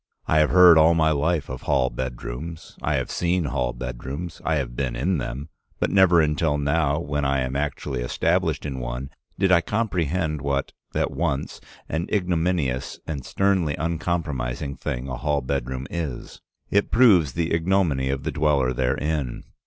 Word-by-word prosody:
I 80 - +3
have 75 - +4
heard 90 -3 +8
all 80 +2 +5
my 80 -1 +3
life 75 +1 0
of 65 0 -6
hall 65 -4 +1
bedrooms, 65 +6 -6
I - - 0
have - - -2
seen 90 0 0
hall 65 -3 -1
bedrooms, 65 +7 -6
I 80 - +1
have 65 -5 -2
been 60 -2 -2
in 85 +7 0
them, 70 +4 -5 0.3
but - - 0
never 90 -4 +6
until 75 0 +1
now, 75 +1 +1
when 75 -2 -2
I 70 -1 +1
am 65 +1 -3
actually 70 -2 -2
established - - 0
in 70 -3 -4
one, - - -5 0.3
did 95 -1 +2
I 85 -2 +6
comprehend 85 -7 -1
what, 70 0 -1 0.2
at - - 0
once, 75 -5 -2 0.3
an 80 +4 -2
ignominious 85 -8 0
and 70 -5 -4
sternly 95 -6 +1
uncompromising 75 -5 -2
thing 65 +1 -4
a 65 -2 -4
hall 75 0 0
bedroom 65 0 -3
is. 80 -7 -5 0.3
It 100 0 +2
proves 95 - +5
the 85 +2 -1
ignominy 80 -6 +1
of 70 0 -2
the - - -2
dweller 75 -4 +2
therein. 65 +1 -1
75 Hz, 165 wpm, -24 LUFS, 65-85 Hz, 0.3 s, heard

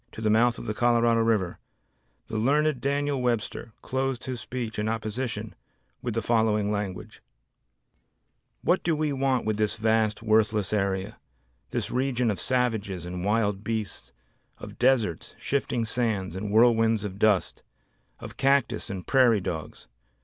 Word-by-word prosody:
to - - -10
the 110 -1 +1
mouth 120 +2 +3
of - - -8
the 105 - -2
Colorado 120 0 +3
River, 110 -6 +1 0.7
the 115 - -7
learned 140 +4 +2
Daniel 140 -1 0
Webster 115 -2 -2
closed 130 -1 -2
his 130 -3 -5
speech 120 -4 -5
in 105 +1 0
opposition 110 0 -3 0.5
with 120 -3 -3
the 115 - -1
following 105 -2 +2
language: 100 -3 -5 1.4
"What 180 - +2
do 165 -2 +1
we 150 -1 0
want 135 -2 0
with 110 -1 0
this 105 -1 +1
vast 110 -1 +1
worthless 110 -2 +2
area; 95 -2 -1 0.5
this - - -2
region 125 -3 +1
of 100 - -4
savages 110 -8 -1
and 90 0 -5
wild 105 -1 0
beasts, 110 -3 -4 0.5
of - - -10
deserts, 120 -10 +1
shifting 130 -4 -1
sands, 110 -6 -1
and 100 +2 -4
whirlwinds 115 -1 +4
of 100 -1 -6
dust; 105 -4 +2 0.6
of - - -10
cactus 140 +1 +1
and 95 -3 -5
prairie 125 -5 +4
dogs? 80 -4 -6
115 Hz, 145 wpm, -26 LUFS, 105-125 Hz, 1.4 s, whirlwinds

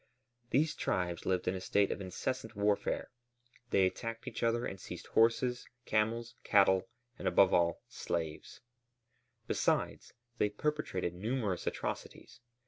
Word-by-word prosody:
These 150 +3 +3
tribes 90 -2 -1
lived 90 -1 +1
in 90 - +2
a 95 - -4
state 100 +1 +2
of - - -3
incessant 110 +5 -3
warfare. 105 0 0 0.6
They 95 -5 +4
attacked 115 +6 -3
each 120 -3 -5
other 115 +1 +2
and 95 - -5
seized - - -7
horses, 120 +2 +2 0.2
camels, 115 +2 0
cattle, 100 0 +4 0.3
and, - - -2
above 95 -1 +5
all, 85 -1 +2
slaves; 80 -3 -4 0.8
besides, - - 0 0.3
they 105 - +3
perpetrated 105 - -2
numerous 105 0 -2
atrocities. - - -4
105 Hz, 130 wpm, -33 LUFS, 95-115 Hz, 0.8 s, above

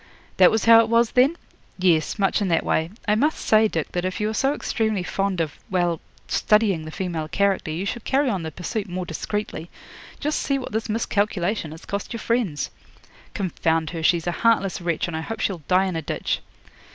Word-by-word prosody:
'That - - +8
was 220 - 0
how 230 0 +9
it 230 -1 +3
was, 230 0 +3
then?' 265 +6 +4 0.4
'Yes, 175 -2 +2
much 200 0 +1
in 200 - +1
that 165 -2 +1
way. 160 +1 +1 0.2
I 210 - +4
must 290 +9 +2
say, 220 0 +4
Dick, 165 -7 -3
that 175 - -2
if 185 0 -2
you 210 0 0
are - - -4
so 270 +5 +2
extremely 220 -4 -1
fond 195 0 -1
of 160 -3 -2
well 175 -3 0 0.3
studying 210 -7 +2
the - - -6
female 170 -3 -3
character, 195 -1 +1
you 165 +5 -3
should 235 +2 -4
carry 275 +1 +2
on 200 -7 0
the 160 - -4
pursuit 190 +6 -4
more 180 0 -3
discreetly. 175 0 -4 0.5
Just 300 +1 -1
see 275 - 0
what 265 - -6
this 220 +1 -2
miscalculation 205 -4 0
has 160 +2 -11
cost 200 +3 -4
your 230 - -4
friends!' 220 -11 -1 0.6
'Confound 165 -4 0
her! 165 -2 -4
She's 165 0 +2
a 175 - 0
heartless 210 -6 +2
wretch, 170 -1 -1
and 170 - -4
I 160 - -2
hope 225 +7 -5
she'll 185 -5 -1
die 185 +1 +4
in 185 -2 -2
a 165 - -1
ditch.' 150 - -2
195 Hz, 210 wpm, -23 LUFS, 170-220 Hz, 0.6 s, how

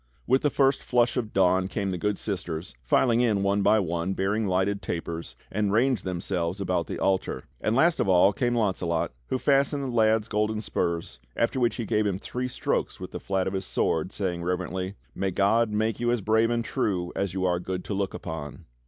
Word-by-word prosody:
With 130 +2 +3
the 145 - +2
first 135 -1 +2
flush 120 -1 +2
of 120 -4 -2
dawn 95 0 +3
came 100 0 -2
the 90 - -2
good 105 0 0
sisters, 90 -6 -4
filing 115 - +3
in 105 -5 +2
one 100 +1 +2
by 110 - +5
one, 85 -1 -1
bearing 105 +3 0
lighted 95 +2 +1
tapers, 85 -1 -5 0.2
and 105 0 0
ranged 120 -1 +2
themselves 90 0 -2
about 90 -3 -1
the - - -4
altar. 95 -1 0 0.2
And 110 - +1
last 165 +6 +4
of - - +1
all 95 +2 +5
came 120 +3 0
Launcelot, 90 -7 0 0.2
who - - 0
fastened 140 +1 +2
the - - -2
lad's 110 -1 +3
golden 105 0 0
spurs, 85 - -2 0.2
after 115 +3 0
which 120 -1 +2
he 120 - -3
gave 105 +1 +1
him 95 -2 -1
three 125 +5 -4
strokes 125 - -2
with - - -7
the - - -5
flat 95 -1 -1
of 95 - -2
his 95 0 -2
sword, 80 +3 0
saying 90 -5 -2
reverently: 90 +2 -2 0.2
"May 95 0 -1
God 105 +5 +2
make 110 +1 0
you 120 0 +1
as 120 -2 +1
brave 110 +3 +3
and 120 -1 0
true 90 -4 -1
as 100 -2 -2
you 95 -1 0
are 90 -1 +1
good 90 0 -4
to - - -3
look 100 -1 -2
upon." 75 -3 -7
100 Hz, 210 wpm, -26 LUFS, 90-115 Hz, 0.2 s, by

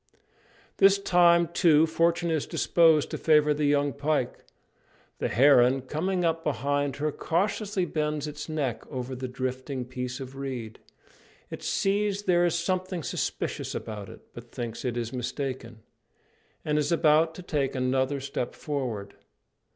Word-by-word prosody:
This 195 0 +6
time, 175 -3 +4
too, 165 -2 +4
fortune 170 +1 +1
is 155 -3 -1
disposed 160 -3 +3
to - - -4
favour 150 -1 +4
the 150 0 0
young 145 -1 +2
pike. 145 -3 -1 0.8
The - - 0
heron, 130 -1 +5
coming 175 +7 -1
up 165 0 0
behind 145 0 -1
her, 150 +1 -1
cautiously 195 +4 -1
bends 150 -2 -2
its 150 +1 -7
neck 145 -7 -2
over 130 -1 -5
the 130 0 -5
drifting 130 +1 -4
piece 125 +1 -5
of 135 0 -8
reed. 130 -5 -6 0.7
It - - -7
sees 200 0 0
there 175 -3 +3
is 170 - 0
something 185 0 -2
suspicious - - -3
about 105 -3 -6
it, - - -12
but - - -11
thinks 115 -2 -5
it 125 -2 -2
is 115 0 -3
mistaken, 125 -3 -5 0.8
and 150 0 +1
is 150 - -1
about 160 0 +3
to 185 - -9
take 145 -6 -1
another 130 +2 0
step 135 -2 -4
forward. 120 -9 -4
145 Hz, 145 wpm, -27 LUFS, 130-165 Hz, 0.8 s, This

